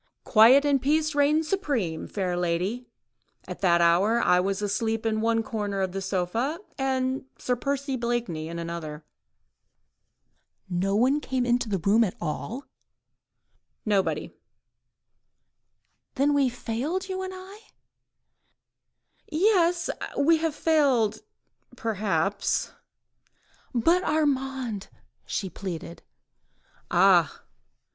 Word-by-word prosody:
"Quiet 245 +6 +6
and 280 -2 +2
peace 310 +2 +1
reigned 295 +2 +3
supreme, 275 - -2
fair 185 -3 -2
lady; 180 +8 -2 0.6
at 180 - -7
that 170 -3 +4
hour 185 +7 +4
I 180 -6 +4
was 195 +2 -1
asleep 220 +2 -1
in 220 -1 0
the 225 0 +2
corner 205 -3 -3
of 190 -1 -2
one 195 - -3
sofa 195 - -1 0.2
and 265 0 -1
Sir 250 - -1
Percy 280 +2 -2
Blakeney 235 -10 -2
in 170 +1 -6
another." 165 -2 -6 1.6
"Nobody 200 +10 +1
came 260 -3 -2
into 240 -1 +1
the 200 - 0
room 200 +6 +3
at 195 - -2
all?" 220 - -4 1.2
"Nobody." 190 -7 0 1.8
"Then 285 +2 +2
we 280 -2 +3
have 245 0 -6
failed, 295 +13 -3
you 375 0 -4
and 375 0 -5
I?.. 380 +3 -11 1.0
." - - -48
"Yes! 350 -1 +2 0.3
we 320 +4 +4
have 320 -1 -2
failed—perhaps.. 220 - -1 0.5
." - - -36
"But 335 +10 +3
Armand?" 270 -8 -1 0.4
she 195 - -2
pleaded. 175 -2 -7 0.9
"Ah! - - +4
230 Hz, 110 wpm, -26 LUFS, 195-285 Hz, 1.8 s, Quiet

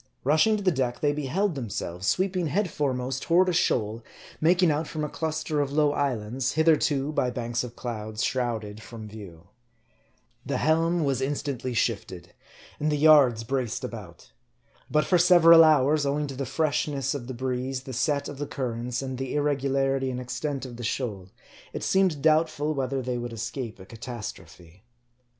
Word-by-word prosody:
Rushing 160 - +3
to 205 - -5
the 185 - +3
deck, 130 -5 -1
they 145 -1 +2
beheld 165 +7 -1
themselves 100 - -4
sweeping 180 - +1
head 180 +4 0
foremost 130 -2 -2
toward 180 +2 +3
a - - 0
shoal 115 -8 0 0.4
making 175 +1 +4
out 150 +1 -1
from 155 -1 -4
a 150 - -2
cluster 155 -1 -2
of 140 -1 -2
low 150 0 +3
islands, 130 -1 -1
hitherto, 150 -2 +2
by 125 -4 0
banks 120 0 -2
of 120 -1 -8
clouds, 110 -2 -4
shrouded 110 -4 -2
from 110 -1 -9
view. 100 -6 -11 1.0
The - - -2
helm 165 +2 +2
was 135 -3 0
instantly 135 -3 -3
shifted; 100 -6 -2 0.5
and 150 +1 0
the 150 - +1
yards 140 -7 +5
braced 130 0 -2
about. 105 -9 -9 0.6
But 150 0 +2
for 180 - +3
several 170 -2 +8
hours, 150 -1 +4
owing 145 +1 0
to 140 -2 -6
the 135 -1 -4
freshness 140 -1 0
of 130 -4 -6
the 130 - -6
breeze, 130 +1 -3
the 130 - -8
set 140 +3 0
of 140 - -8
the 145 - -3
currents, 125 0 -3
and 130 -1 -5
the 135 +1 -3
irregularity 135 -2 0
and 125 -1 -3
ex 125 0 -6
MARDT. 125 - -6
101 145 -3 -2
tent - - -6
of 120 - -10
the 120 - -7
shoal, 105 -6 -3 0.4
it - - -5
seemed 185 -7 +2
doubtful 155 -1 +2
whether 135 -1 -2
they 125 0 -2
would 120 0 -5
escape 115 0 -5
a 95 - -11
catastrophe. 105 -6 -9
135 Hz, 175 wpm, -26 LUFS, 120-150 Hz, 1.0 s, several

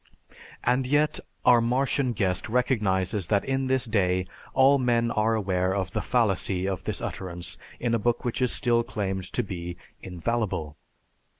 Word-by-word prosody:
And 125 +1 +2
yet 145 +2 +2 0.3
our 120 -2 +7
Martian 125 +2 +1
guest 95 -3 -1
recognizes 105 -6 +1
that 100 +1 +1
in 135 0 0
this 130 0 +1
day 95 -5 +1 0.3
all 135 +1 +6
men 120 -2 +2
are 110 +1 +2
aware 95 -2 0
of 95 -2 -2
the - - -1
fallacy 95 -5 +1
of 95 -2 -3
this - - -2
utterance 85 -2 -5 0.2
in 120 -1 0
a 115 - +2
book 120 +3 0
which 120 +2 -2
is 125 - +2
still 120 -1 +2
claimed 95 -5 -3
to 125 - 0
be 90 -3 -6 0.2
infallible. 90 -4 -2
110 Hz, 160 wpm, -26 LUFS, 95-125 Hz, 0.3 s, our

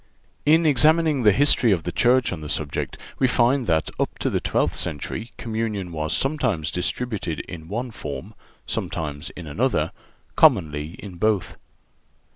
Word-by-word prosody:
In 160 +2 +5
examining 155 +1 +4
the 105 -3 +6
history 120 0 +4
of 85 -4 +1
the 90 - -3
Church 125 +3 +3
on 80 - -6
the 75 - -6
subject 75 -2 -3 0.2
we 130 - +4
find 125 0 +2
that 80 -2 +1
up - - -1
to - - -1
the - - +1
twelfth - - 0
century 110 +10 -4
communion 110 -5 -3
was 80 +1 -1
sometimes 110 - 0
distributed 90 -2 -2
in 80 -3 -9
one 120 +6 -3
form, - - -7 0.3
sometimes 75 -1 -4
in 90 - -8
another, 75 - 0 0.4
commonly 80 - +3
in 95 -4 -9
both. 105 0 0
105 Hz, 150 wpm, -23 LUFS, 80-125 Hz, 0.4 s, the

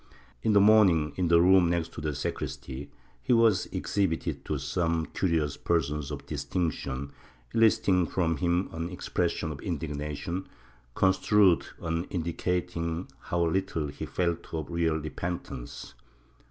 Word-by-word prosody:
In 110 - +2
the 100 - +7
morning, 100 -8 +5
in 90 -3 0
a 85 - +7
room 90 0 +6
next 85 -1 -1
to - - -7
the 75 -1 -2
sacristy, 65 +1 -5 0.3
he 95 - +2
was 115 -5 +4
exhibited 95 -5 -1
to 75 - -1
some 80 +4 0
curious 80 -6 0
persons 75 -3 0
of 70 -1 -6
distinction, 70 -3 -3 0.4
eliciting 95 -5 +4
from 85 -3 0
him 90 +1 +1
an 80 +1 -4
expression 85 -2 -2
of 70 - -7
indig 80 -4 -3
nation, 75 +5 -4 0.5
construed 95 -1 +4 0.2
as 80 +1 0
indicating 85 0 -2
how 85 0 0
little 80 -3 -1
he - - -6
felt 85 -1 -2
of 80 0 -4
real 85 -2 +1
repentance. 80 -4 -5
85 Hz, 135 wpm, -28 LUFS, 75-90 Hz, 0.5 s, the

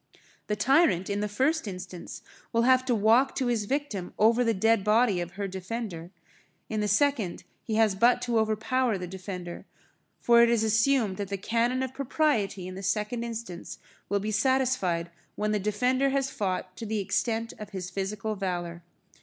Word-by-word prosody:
The 210 - 0
tyrant, 235 - +3
in 200 - -1
the 210 - -1
first 265 +7 0
instance, 185 -2 -8 0.3
will 230 0 +2
have 255 +1 +5
to 250 -2 +2
walk 225 +6 +3
to 265 - 0
his 235 -4 0
victim 245 -8 -3
over 230 +3 +4
the 230 - +2
dead 225 +1 +3
body 210 -3 +3
of 175 0 -6
her 200 0 -3
defender; 185 -2 -5 0.6
in 215 - -2
the 210 - 0
second, 220 -4 +1 0.2
he 220 - -3
has 220 -2 +4
but 240 +6 +4
to 240 -2 +1
overpower 220 +2 +1
the 180 - -5
defender; 180 -1 -7 0.6
for 235 0 +5
it 235 - +5
is 235 -2 +2
assumed 220 -2 +2
that 205 - -3
the 200 +1 -3
cannon 235 +5 0
of 260 -1 -4
propriety 240 - 0
in 185 - -7
the 190 - -7
second 210 +4 -1
instance 230 -7 -6 0.3
will 200 - +1
be 210 +2 -3
satisfied 215 -8 +1 0.2
when 210 0 -1
the 210 - +1
defender 250 +7 +1
has 270 0 0
fought 185 -2 -3
to 225 - -6
the 220 +1 -1
extent 225 +3 -1
of 210 -1 -7
his 185 -2 -6
physical 200 +3 -3
valour. 175 -4 -4
215 Hz, 180 wpm, -27 LUFS, 195-240 Hz, 0.6 s, have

